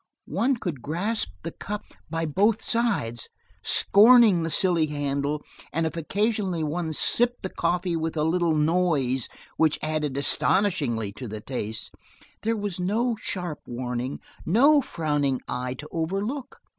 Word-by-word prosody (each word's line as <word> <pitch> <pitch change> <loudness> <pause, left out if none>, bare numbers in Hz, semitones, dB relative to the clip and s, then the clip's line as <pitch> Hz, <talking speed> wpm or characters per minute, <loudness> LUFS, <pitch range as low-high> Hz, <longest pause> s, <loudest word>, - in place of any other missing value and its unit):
One 260 +2 +1
could 170 - -4
grasp 175 - -2
the - - -4
cup 210 +1 -6 0.3
by 165 +1 -1
both 205 +8 +2
sides, 200 - 0 0.3
scorning 220 -3 +6
the 165 - -1
silly 165 0 +3
handle, 145 0 -2 0.3
and 165 +1 0
if 160 - -3
occasionally 195 0 -1
one 160 +2 -2
sipped 240 +10 +2
the 190 - -4
coffee 175 +1 0
with 160 0 -2
a 150 - +2
little 165 0 +2
noise 150 -6 +1 0.3
which 160 -2 +3
added 155 -3 -1
astonishingly 140 - +1
to 115 +5 -8
the 110 0 -6
taste 110 -2 -5 0.5
there 225 +1 0
was 205 -3 -3
no 225 +6 +1
sharp 180 -5 -4
warning, 125 +1 -3 0.2
no 280 - +5
frowning 145 - -1
eye 125 +1 -3
to 150 +3 -9
overlook. 200 - -3
165 Hz, 140 wpm, -25 LUFS, 145-205 Hz, 0.5 s, scorning